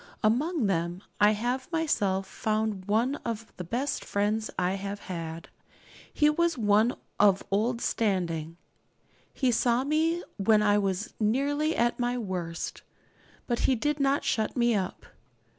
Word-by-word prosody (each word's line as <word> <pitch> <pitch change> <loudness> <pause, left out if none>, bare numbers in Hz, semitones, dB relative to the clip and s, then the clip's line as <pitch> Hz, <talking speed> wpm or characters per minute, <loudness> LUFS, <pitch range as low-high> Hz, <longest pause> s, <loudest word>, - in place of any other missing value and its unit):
Among 265 +6 +2
them 175 0 -1 0.2
I 210 +1 +6
have 245 +7 -2
myself 205 - +1
found 215 -1 -2
one 230 +7 +1
of 225 -1 -6
the 180 - -4
best 255 +10 -2
friends 210 +2 0
I 180 0 +1
have 200 +1 -5
had. 165 -2 -6 0.6
He 295 - +3
was 335 +1 +2
one 215 +1 +3 0.2
of 200 -2 +5
old 230 +4 +1
standing. 170 -6 -1 0.7
He 260 -3 +1
saw 240 +2 +2
me 320 +4 +1
when 210 +1 +4
I 205 0 +4
was 195 +1 -2
nearly 285 +8 +1
at 240 +1 +1
my 245 0 0
worst; 180 -7 -4 0.6
but 240 -1 -1
he 260 - +4
did 295 +5 -1
not 275 0 +2
shut 220 +3 -1
me 240 -1 +3
up. 190 -3 -2
220 Hz, 140 wpm, -28 LUFS, 195-255 Hz, 0.7 s, I